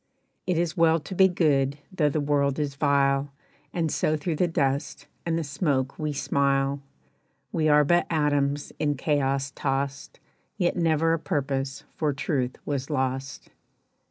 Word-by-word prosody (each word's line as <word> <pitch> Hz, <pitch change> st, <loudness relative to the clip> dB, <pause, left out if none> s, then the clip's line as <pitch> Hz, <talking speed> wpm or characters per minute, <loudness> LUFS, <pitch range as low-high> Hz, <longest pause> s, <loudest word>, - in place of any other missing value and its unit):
"It 180 Hz, -3 st, +1 dB
is 170 Hz, -2 st, 0 dB
well 165 Hz, 0 st, +4 dB
to 170 Hz, -, -8 dB
be 190 Hz, +1 st, +6 dB
good 145 Hz, -6 st, +1 dB
though 155 Hz, -6 st, +2 dB
the 155 Hz, -, -1 dB
world 140 Hz, -1 st, +1 dB
is 145 Hz, -2 st, -1 dB
vile, 140 Hz, -1 st, +2 dB, 0.4 s
And 165 Hz, -2 st, -1 dB
so 155 Hz, -, +1 dB
through 155 Hz, +1 st, -2 dB
the 180 Hz, -, +2 dB
dust 140 Hz, -3 st, -1 dB, 0.2 s
and 165 Hz, 0 st, +1 dB
the 165 Hz, -, -1 dB
smoke 140 Hz, -2 st, -1 dB
we 155 Hz, -1 st, -1 dB
smile, 140 Hz, 0 st, 0 dB, 0.7 s
"We 155 Hz, -2 st, +1 dB
are 150 Hz, 0 st, +6 dB
but 175 Hz, +4 st, +2 dB
atoms 145 Hz, -2 st, 0 dB
in 145 Hz, -1 st, +1 dB
chaos 135 Hz, -1 st, 0 dB
tossed, 140 Hz, 0 st, -3 dB, 0.4 s
Yet 175 Hz, -4 st, +1 dB
never 165 Hz, -1 st, +2 dB
a 165 Hz, -, 0 dB
purpose 135 Hz, -5 st, -2 dB
for 150 Hz, -3 st, +1 dB
truth 135 Hz, -2 st, -2 dB
was 140 Hz, -2 st, -3 dB
lost." 135 Hz, -1 st, -3 dB
145 Hz, 155 wpm, -26 LUFS, 140-160 Hz, 0.7 s, be